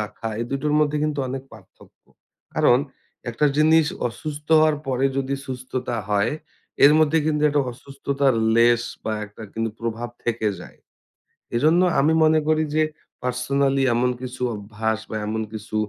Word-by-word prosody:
রাখা 105 +1 -5
এই - - -1
দুটোর 140 +2 -1
মধ্যে 150 0 +1
কিন্তু 150 -1 -2
অনেক 130 +1 -4
পার্থক্য। 110 -4 -18 0.5
কারণ 120 - +4 0.5
একটা 150 +6 +1
জিনিস 160 +1 +5 0.2
অসুস্থ 150 +5 -7
হওয়ার 155 -1 +3
পরে 130 0 0
যদি 135 0 -1
সুস্থতা 130 -2 -4
হয়, 105 +4 +2 0.5
এর 145 - +8
মধ্যে 155 0 +3
কিন্তু 150 -1 0
একটা 145 0 +2
অসুস্থতার 135 +1 -1 0.2
লেশ 120 0 +5 0.2
বা 110 - -1
একটা 105 +2 -13
কিন্তু 115 0 -2
প্রভাব 115 +1 -3 0.2
থেকে 115 -2 0
যায়।" - - -13 0.8
এজন্য 155 +8 +4 0.2
আমি 150 +3 +3
মনে 155 0 +4
করি 155 0 +3
যে, 155 - +4 0.4
পার্সোনালি 135 +2 +1
এমন 125 +1 +2
কিছু 130 0 -7
অভ্যাস 110 +1 -3
বা 110 - -5
এমন 110 +1 -2
কিছু 110 0 -7
130 Hz, 150 wpm, -23 LUFS, 115-150 Hz, 0.8 s, এর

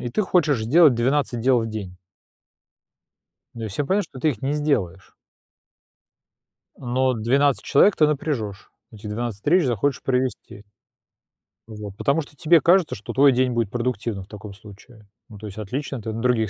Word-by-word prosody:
и 120 - -4
ты 170 - 0
хочешь 155 - +1
сделать 150 +4 +5
12 125 +1 0
дел 125 0 +3
в 115 - -3
день. 100 -4 -7 1.6
Ну 115 -2 -6
и - - -3
всё 120 +9 -3
понятно, 200 +6 +1
что 130 - -12
ты 155 - +2
их 120 -8 -5
не 135 +2 -1
сделаешь. 105 - -2 1.6
Но 130 +1 0
12 130 +5 +1
человек 195 +8 +4
ты 155 - +4
напряжёшь, 130 -9 -3 0.2
эти 110 -1 -10
12 110 0 -4
встреч 170 - +3
захочешь 130 +2 -1
провести. 130 -5 -3 1.0
Вот, 105 -3 -9
потому 140 +4 +1
что 145 -1 -13
тебе 165 +3 +4
кажется, 175 +1 +3
что 100 - -8
твой 140 +1 +5
день 130 0 +1
будет 115 -3 -1
продуктивным 115 -4 -3
в - - -30
таком 105 -1 -10
случае. 105 +2 -16 0.2
Ну, 105 - -12
то 110 - -10
есть 100 -1 -9
отлично, 125 +4 -5
ты 110 +1 -5
на 115 - -5
других 115 -4 +1
120 Hz, 170 wpm, -23 LUFS, 110-140 Hz, 1.6 s, сделать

